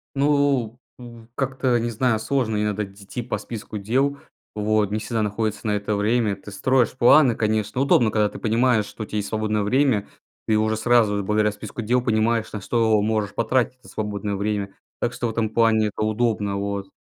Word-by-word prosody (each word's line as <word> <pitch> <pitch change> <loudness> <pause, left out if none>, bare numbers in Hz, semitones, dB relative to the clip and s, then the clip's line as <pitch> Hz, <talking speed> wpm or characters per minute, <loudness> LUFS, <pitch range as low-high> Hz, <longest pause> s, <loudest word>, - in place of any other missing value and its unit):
Ну, 140 -5 +1 0.2
в 120 -2 -12
как-то 130 -2 0
не 120 +1 -2
знаю, 115 0 +1
сложно 110 -1 -1
иногда 105 0 -1
идти 100 +4 -8
по 120 - -3
списку 110 -2 -7
дел, 130 +8 0 0.4
вот 105 -1 +1
не 110 - -1
всегда 115 0 -2
находится 110 +1 -2
на - - +1
это 105 +1 -2
время. 105 0 +1
Ты 100 +2 -12
строишь 125 +3 +1
планы, 130 0 +6
конечно. 110 +1 -1
Удобно, 120 -5 +3
когда 105 -1 +2
ты - - -10
понимаешь, 115 -1 +2
что 110 - -8
у - - -6
тебя 105 - -5
есть 100 -1 -3
свободное 110 -1 -1
время. 125 -1 +2 0.4
Ты 110 - +3
уже 110 0 +1
сразу, 110 -3 +2
благодаря 105 +1 +1
списку 105 +2 -7
дел, 125 +4 +2
понимаешь, 115 -1 +1
на 105 - -5
что 110 +1 +2
можешь 105 -2 -1
потратить 120 +2 0
это 125 - -20
свободное 105 -1 -3
время. 100 0 -2 0.3
Так 120 - -1
что 120 - -2
в - - -2
этом 110 -1 -1
плане 110 -2 +3
это - - -4
удобно, 110 -2 0
вот. 100 -1 -3
110 Hz, 190 wpm, -23 LUFS, 105-120 Hz, 0.4 s, планы